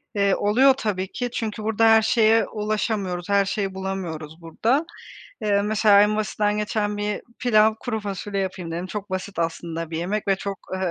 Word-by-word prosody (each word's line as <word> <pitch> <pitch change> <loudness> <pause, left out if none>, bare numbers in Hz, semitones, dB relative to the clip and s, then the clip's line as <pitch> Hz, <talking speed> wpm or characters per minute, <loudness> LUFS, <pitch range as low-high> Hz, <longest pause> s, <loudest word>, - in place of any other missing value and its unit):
Eee, 200 -1 +3
oluyor 255 +7 +4
tabii 205 -7 -3
ki. 245 -1 -3
Çünkü 220 -2 -4
burada 220 +1 +2
her 225 0 +7
şeye 225 0 +3
ulaşamıyoruz, 210 -4 -2
her 200 0 +3
şeyi 195 0 -2
bulamıyoruz 175 -5 -5
burada. 230 - 0 0.6
Eee, 200 -1 +2
mesela 210 -1 +4
en 210 +1 +2
basitinden 210 0 0
geçen 210 0 -1
bir 205 0 -3 0.2
pilav, 220 -3 +4
kuru 220 -3 -3
fasulye 200 0 -4
yapayım 185 -3 -4
dedim. 170 +2 -4
Çok 200 +1 -6
basit 190 +1 -5
aslında 165 0 -3
bir 160 - -3
yemek 200 +5 -2
ve 195 - +3
çok, 195 0 -5 0.2
eee, 185 -1 -1
205 Hz, 175 wpm, -23 LUFS, 190-215 Hz, 0.6 s, her